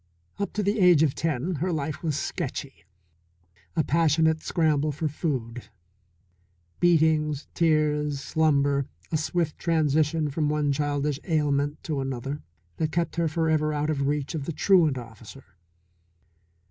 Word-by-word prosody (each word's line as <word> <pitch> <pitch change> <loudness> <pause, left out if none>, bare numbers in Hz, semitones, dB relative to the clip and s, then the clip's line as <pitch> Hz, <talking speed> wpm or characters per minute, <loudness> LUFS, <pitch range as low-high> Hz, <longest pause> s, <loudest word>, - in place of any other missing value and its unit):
Up 200 - -2
to 210 - -1
the 205 +3 0
age 175 -5 +6
of 145 -4 +2
ten 165 +2 -2
her 180 +6 -1
life 150 -2 -3
was 155 -4 -1
sketchy. 140 - -5 0.9
A 160 - +2
passionate 160 +1 +2
scramble 155 -3 +1
for 155 +2 -2
food, 130 -6 -4 1.1
beatings, 155 -3 +2
tears, 150 -3 +1
slumber, 140 -3 +1 0.2
a 155 - +2
swift 160 0 -2
transition 155 -1 +1
from 150 +1 0
one 150 -1 +1
childish 145 0 -1
ailment 145 -3 0
to 150 -4 -2
another 135 +2 -4 0.4
that 155 -1 -1
kept 170 0 -1
her 170 -1 +2
forever 155 -1 +1
out 150 +1 0
of 140 -2 -1
reach 145 +1 -1
of 150 -4 -4
the 165 - -3
truant 160 -4 +3
officer. 120 +2 -11
150 Hz, 135 wpm, -26 LUFS, 140-160 Hz, 1.1 s, age